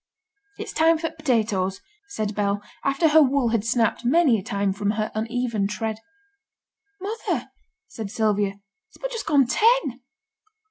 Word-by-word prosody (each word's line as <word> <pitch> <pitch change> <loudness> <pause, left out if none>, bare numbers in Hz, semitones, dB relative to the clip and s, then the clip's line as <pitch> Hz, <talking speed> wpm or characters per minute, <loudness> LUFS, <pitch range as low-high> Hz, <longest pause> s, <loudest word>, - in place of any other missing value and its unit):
'It's - - -6
time 325 +1 +4
for 325 +1 -2
t' - - -23
potatoes,' 215 -10 0 0.3
said 215 - -3
Bell, 205 0 -1 0.2
after 275 +4 +2
her 315 +1 +7
wool 275 -3 +3
had 225 -2 0
snapped 230 0 +1
many 260 -2 +4
a - - -6
time 200 0 -1
from 205 +1 -2
her 215 0 -1
uneven 225 -2 -1
tread. 215 +2 -3 1.0
'Mother,' 415 +4 -3 0.4
said 220 -3 -7
Sylvia, 205 -2 0 0.3
'it's - - -19
but - - -4
just 460 -2 -5
gone 285 -3 +4
ten!' 325 - +2
230 Hz, 150 wpm, -24 LUFS, 210-310 Hz, 1.0 s, her